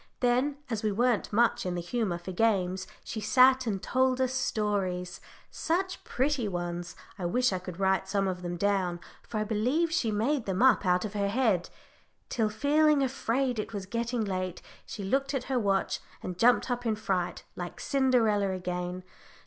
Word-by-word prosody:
Then 255 Hz, +3 st, +2 dB
as 225 Hz, -3 st, -2 dB
we 215 Hz, -, 0 dB
weren't 235 Hz, +1 st, +1 dB
much 230 Hz, +2 st, +3 dB
in 180 Hz, -1 st, -2 dB
the -, -, -2 dB
humour 190 Hz, 0 st, -1 dB
for 175 Hz, +2 st, -7 dB
games, 190 Hz, -2 st, +1 dB, 0.2 s
she 220 Hz, -, -5 dB
sat 255 Hz, +3 st, +5 dB
and 200 Hz, -3 st, -1 dB
told 260 Hz, 0 st, +2 dB
us 260 Hz, 0 st, +1 dB
stories 195 Hz, -7 st, -1 dB, 0.3 s
such 370 Hz, +3 st, -2 dB
pretty 265 Hz, -3 st, 0 dB
ones, 175 Hz, -2 st, -4 dB, 0.2 s
I 175 Hz, -, -1 dB
wish 245 Hz, +3 st, +2 dB
I 185 Hz, -, -1 dB
could 180 Hz, -1 st, -8 dB
write 190 Hz, 0 st, +2 dB
some 195 Hz, 0 st, +1 dB
of 180 Hz, -1 st, -3 dB
them 175 Hz, 0 st, -4 dB
down, 185 Hz, -2 st, 0 dB, 0.2 s
for 225 Hz, -, -6 dB
I -, -, +1 dB
believe 250 Hz, +11 st, +1 dB
she 290 Hz, -9 st, +1 dB
made 230 Hz, +5 st, 0 dB
them 190 Hz, +4 st, +1 dB
up 260 Hz, -6 st, +5 dB
out 180 Hz, +1 st, +3 dB
of 210 Hz, -, -5 dB
her 200 Hz, -1 st, 0 dB
head 215 Hz, -6 st, +1 dB, 0.6 s
till, 220 Hz, -3 st, +1 dB
feeling 290 Hz, +5 st, +3 dB
afraid 255 Hz, -1 st, 0 dB
it 220 Hz, +1 st, -4 dB
was 200 Hz, -2 st, -4 dB
getting 235 Hz, +2 st, -2 dB
late, 185 Hz, -2 st, -3 dB, 0.2 s
she 205 Hz, -, -6 dB
looked 275 Hz, +7 st, 0 dB
at 260 Hz, -, -1 dB
her 260 Hz, -1 st, 0 dB
watch, 195 Hz, -3 st, 0 dB, 0.2 s
and 180 Hz, -, -4 dB
jumped 245 Hz, +6 st, +3 dB
up 245 Hz, 0 st, -2 dB
in 225 Hz, -2 st, +1 dB
a -, -, -2 dB
fright, 190 Hz, -4 st, -2 dB
like 175 Hz, -1 st, -6 dB
Cinderella 240 Hz, -8 st, +2 dB
again. 180 Hz, 0 st, -4 dB
215 Hz, 185 wpm, -29 LUFS, 185-255 Hz, 0.6 s, sat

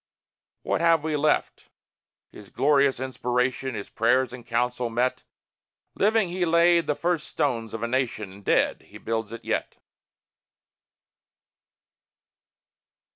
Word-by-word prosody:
What -, -, -1 dB
have 165 Hz, -2 st, +4 dB
we 155 Hz, -1 st, -1 dB
left? 150 Hz, +1 st, 0 dB, 0.6 s
His 100 Hz, -2 st, -13 dB
glorious 140 Hz, -1 st, +2 dB
inspiration, 130 Hz, 0 st, -1 dB
His 100 Hz, -, -7 dB
prayers 125 Hz, +2 st, +2 dB
in 125 Hz, -1 st, -9 dB
council 120 Hz, +1 st, -1 dB
met. 120 Hz, +3 st, 0 dB, 0.7 s
Living, 215 Hz, -2 st, +2 dB
he 180 Hz, +1 st, -2 dB
laid 170 Hz, -1 st, +4 dB
the 150 Hz, -, +1 dB
first 170 Hz, -1 st, -1 dB
stones 115 Hz, -6 st, -1 dB
of 115 Hz, -, -5 dB
a -, -, 0 dB
nation; 120 Hz, -5 st, -2 dB
And 100 Hz, +1 st, -14 dB
dead, -, -, +1 dB
he -, -, -11 dB
builds 115 Hz, -1 st, -3 dB
it 115 Hz, -, -9 dB
yet. -, -, -2 dB
130 Hz, 125 wpm, -25 LUFS, 115-155 Hz, 0.7 s, have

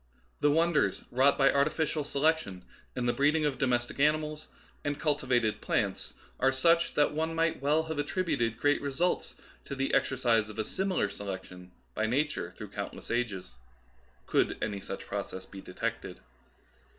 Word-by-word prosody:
The 145 Hz, -, +4 dB
wonders 165 Hz, +2 st, +2 dB
wrought 135 Hz, +3 st, +4 dB
by 135 Hz, -1 st, +5 dB
artificial 150 Hz, +2 st, +1 dB
selection 140 Hz, -, 0 dB, 0.3 s
in 125 Hz, -, -1 dB
the 120 Hz, -, +2 dB
breeding 150 Hz, +2 st, +3 dB
of 135 Hz, -4 st, -1 dB
domestic 120 Hz, -1 st, 0 dB
animals 150 Hz, +1 st, +1 dB, 0.4 s
and 145 Hz, 0 st, -2 dB
cultivated 130 Hz, -7 st, +1 dB
plants -, -, -1 dB, 0.2 s
are 135 Hz, +1 st, +4 dB
such 165 Hz, +5 st, +3 dB
that 145 Hz, -, +3 dB
one 160 Hz, +2 st, -1 dB
might 165 Hz, -3 st, +1 dB
well 150 Hz, +3 st, +3 dB
have 160 Hz, -1 st, -5 dB
attrib 185 Hz, +6 st, -1 dB
uted 115 Hz, -1 st, 0 dB
great 145 Hz, +3 st, +2 dB
results 145 Hz, +6 st, -1 dB, 0.3 s
to 140 Hz, -, -5 dB
the 135 Hz, 0 st, -1 dB
exercise 120 Hz, -5 st, +2 dB
of 110 Hz, -, -10 dB
a 110 Hz, -, 0 dB
similar 190 Hz, -, 0 dB
se 100 Hz, +1 st, -8 dB
lection 90 Hz, -2 st, -7 dB, 0.2 s
by 110 Hz, -, 0 dB
Nature 145 Hz, +6 st, -1 dB
through -, -, -7 dB
countless -, -, -6 dB
ages, 105 Hz, -, -2 dB, 0.7 s
could -, -, +1 dB
any 100 Hz, -2 st, -2 dB
such 95 Hz, -, -7 dB
process 100 Hz, -2 st, -5 dB
be 95 Hz, -, -10 dB
detected. 90 Hz, -, -4 dB
140 Hz, 160 wpm, -30 LUFS, 115-155 Hz, 0.7 s, by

